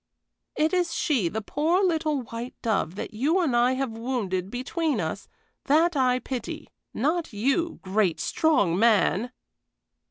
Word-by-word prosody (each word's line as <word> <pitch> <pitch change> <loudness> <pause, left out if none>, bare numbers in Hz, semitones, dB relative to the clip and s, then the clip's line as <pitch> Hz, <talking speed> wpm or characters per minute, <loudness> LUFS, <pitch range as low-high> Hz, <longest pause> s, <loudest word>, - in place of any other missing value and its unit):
It 310 +3 +1
is 355 -2 +1
she, 240 - +1
the 220 +4 -4
poor, 325 - +1
little 315 -6 0
white 235 +2 -7
dove, 200 -7 0
that 205 - -6
you 290 - +1
and 305 -9 +1
I 245 +2 +4
have 260 -2 -2
wounded 220 -6 -3
between 260 +3 -2
us, 165 +3 -4 0.4
that 320 +4 +3
I 255 -2 +3
pity, 255 -1 -6 0.2
not 310 +3 -1
you 275 +11 0
great, 190 -2 +1
strong 200 - +2
man!" 225 0 +3
255 Hz, 145 wpm, -26 LUFS, 215-315 Hz, 0.4 s, I